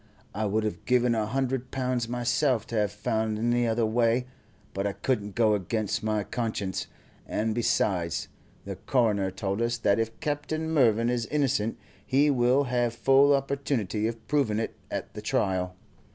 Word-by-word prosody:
I 110 - -1
would 105 +2 0
have 105 -6 -4
given 125 -1 +3
a 110 -2 0
hundred 130 +1 -1
pounds 125 -3 -1
myself 120 0 +1
to 115 - -4
have 105 -2 +1
found 110 0 -1
any 120 +2 +1
other 115 0 +1
way, 115 +2 +2 0.5
but 95 +1 -1
I 100 - -2
couldn't 105 -6 -2
go 110 -2 +4
against 105 +1 -1
my 110 -1 0
conscience; 105 -5 -3 0.4
and 110 +1 -1
besides, 90 -7 0 0.4
the - - -5
coroner 105 -7 +1
told 100 +3 -3
us 120 +1 0
that 105 -2 +2
if 115 0 -2
Captain 155 +2 -2
Mervyn 120 -5 +3
is 120 -2 -1
innocent, 135 -7 0 0.3
he 140 +3 +3
will 125 +1 +3
have 120 -2 0
full 135 +3 +5
opportunity 135 -7 -1
of 115 -1 -6
proving 135 -7 +1
it 115 - -2 0.2
at - - -5
the - - -7
trial. 90 -1 0
115 Hz, 165 wpm, -27 LUFS, 105-125 Hz, 0.5 s, full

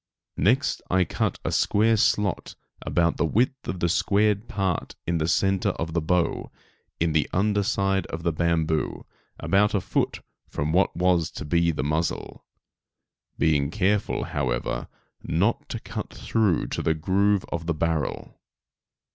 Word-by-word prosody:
Next 125 +8 +2
I 95 0 +3
cut - - -1
a - - 0
square 110 +2 +3
slot 105 -2 0 0.3
about 85 -1 +1
the - - +1
width 125 - 0
of 90 - -4
the 85 - +3
squared 105 +4 +2
part 95 -4 -2
in 85 0 0
the 80 - 0
centre 95 +2 +2
of 80 0 -3
the 85 - +1
bow, 85 +2 0 0.5
in 85 0 +1
the 75 -1 +1
under 105 +2 +2
side 95 -2 0
of 85 0 -6
the 85 - +1
bamboo 80 -1 0 0.3
about 105 +2 +2
a - - +3
foot - - -1 0.3
from 75 +2 -2
what 95 +3 +2
was 90 -2 +2
to - - -6
be 85 +2 +2
the 75 -5 -1
muzzle, 80 +3 -2 0.9
being 70 -3 +2
careful, 100 +3 0
however, - - -2 0.3
not - - 0
to - - -4
cut - - -6
through 105 -8 +1
into - - -3
the 80 - +1
groove 95 +4 +1
of 85 -1 -4
the 85 - +1
barrel. 80 -2 -2
85 Hz, 155 wpm, -25 LUFS, 80-100 Hz, 0.9 s, I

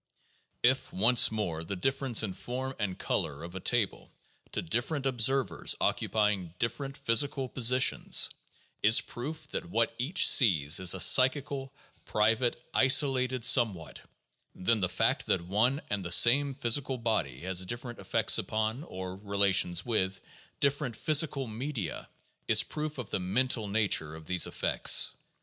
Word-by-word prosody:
2 120 - +6
If, 130 0 -7
once 115 +5 +4
more, 90 -7 -4
the 100 +4 -5
difference 135 +3 0
in 100 -3 -4
form 130 +6 -6
and 95 -4 -3
color 70 +1 -3
of 85 +1 -9
a 95 - -6
table 115 +1 -2 0.4
to - - -4
differ 120 - -2
ent 140 -2 -5
observers, 130 +1 +1
occupying 105 -6 -1
different 135 +6 -4
physical 135 +1 +1
positions, 130 +2 +2 0.5
is 110 +2 +6
proof 155 +5 -8
that - - -6
what 115 +5 0
each 145 +10 +2
sees 80 - +4
is 95 0 +3
a - - -6
psychical, 135 - +3 0.3
private, 115 +3 0
isolated 130 -2 +2
somewhat, 100 - +2 0.5
then 110 +4 0
the 90 -2 -1
fact 95 - -1
that - - +1
one 110 - -1
and 100 -2 -3
the 85 - -6
same 135 +7 +5
physical 135 +1 +1
body 110 - -3
has 95 +1 -2
different 120 +4 -7
effects - - +1
upon, 110 +4 -3
or 95 - -8
relations 100 -3 0
with, 95 -5 -2 0.4
different 140 -3 -1
physical 150 -1 +1
media 110 - -6 0.4
is - - +5
proof 150 -1 -6
of 125 -5 -8
the - - -2
mental 110 +4 -1
nature 100 -7 0
of 80 0 -12
these 90 0 +1
effects. - - +2
115 Hz, 145 wpm, -29 LUFS, 95-130 Hz, 0.5 s, 2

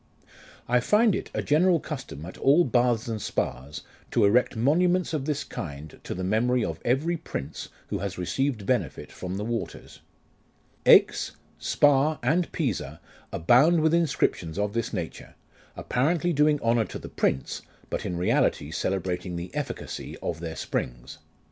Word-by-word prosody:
I 125 +1 +3
find 210 - +4
it - - -3
a - - -2
general 170 +3 +3
custom 135 - -7
at 90 - -9
all 145 +6 +5
baths 120 -4 +1
and 110 -2 -3
spas, 70 -3 -3 0.3
to 115 - +3
erect 120 +5 +3
monuments 175 +9 +2
of 145 -4 -1
this 150 -1 -1
kind 75 -2 -7
to - - -5
the 90 - -4
memory 115 +5 +2
of - - -4
every 150 +8 +1
prince 75 - -6 0.2
who - - -2
has 100 -1 -4
received 110 +4 -1
benefit 110 - -1
from 90 +1 -5
the 105 - -3
waters. 115 0 -5 0.9
Aix, - - +5 0.3
Spa, 145 - +3
and 160 +7 +1
Pisa 130 - -2 0.3
abound 140 - +4
with 160 +1 +3
inscriptions 135 - +1
of 105 0 -1
this 115 0 -2
nature, 90 -6 -6 0.4
appa - - -3
rently 170 +5 +2
doing 150 0 +3
honour 115 -1 +3
to - - -7
the - - -9
prince, 65 - -1 0.3
but - - -2
in 90 - -3
reality 80 -3 +1
celebrating 90 0 -2
the 85 +1 -6
efficacy - - -5
of 80 - -3
their 80 -1 -5
springs. - - -4
120 Hz, 155 wpm, -26 LUFS, 90-150 Hz, 0.9 s, all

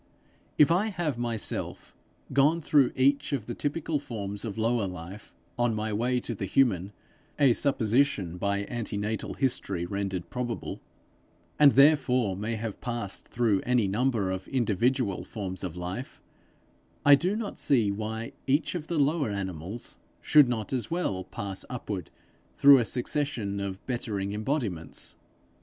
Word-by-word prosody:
If 150 +2 +6
I 190 +6 +3
have 170 - -2
myself 115 -3 -3 0.4
gone 145 +5 +4
through 145 -4 +3
each 140 +2 +2
of 125 -7 -1
the 120 - -4
typical 150 +3 -2
forms 105 -7 -5
of 110 -2 -5
lower 115 -2 +1
life 90 +3 -9 0.2
on 120 -2 +2
my 110 0 -2
way 125 +4 +1
to 120 - -4
the 95 -2 -4
human 100 -5 +2 0.5
a 140 -4 +5
supposition 115 - +1
by 100 +1 0
antenatal 110 -2 -3
history 120 -10 -1
rendered 95 -1 -3
probable 125 -2 -4 0.8
and 145 -2 +8
therefore 130 -7 +4
may 110 +4 -3
have 110 -1 -5
passed 120 -6 -4
through 115 -5 +1
any 125 -4 +2
number 110 -2 +1
of 95 0 -4
individual 120 -4 +1
forms 95 -2 -5
of 90 -2 -5
life, 90 +9 -5 0.9
I 145 - +9
do 180 +8 +3
not 220 -2 -4
see 115 -8 +3
why 110 +2 -4 0.2
each 140 +4 +2
of 165 -3 -4
the 170 - -2
lower 145 -2 +2
animals 95 +1 -5 0.2
should 150 -4 +6
not 115 0 -2
as 125 -3 -1
well 135 - -1
pass 100 -2 -6
upward 105 - -5 0.5
through 140 -1 +8
a 120 - +1
succession 120 -5 -2
of 100 -1 -5
bettering 105 -6 -2
embodiments. 105 - -3
115 Hz, 145 wpm, -28 LUFS, 100-135 Hz, 0.9 s, I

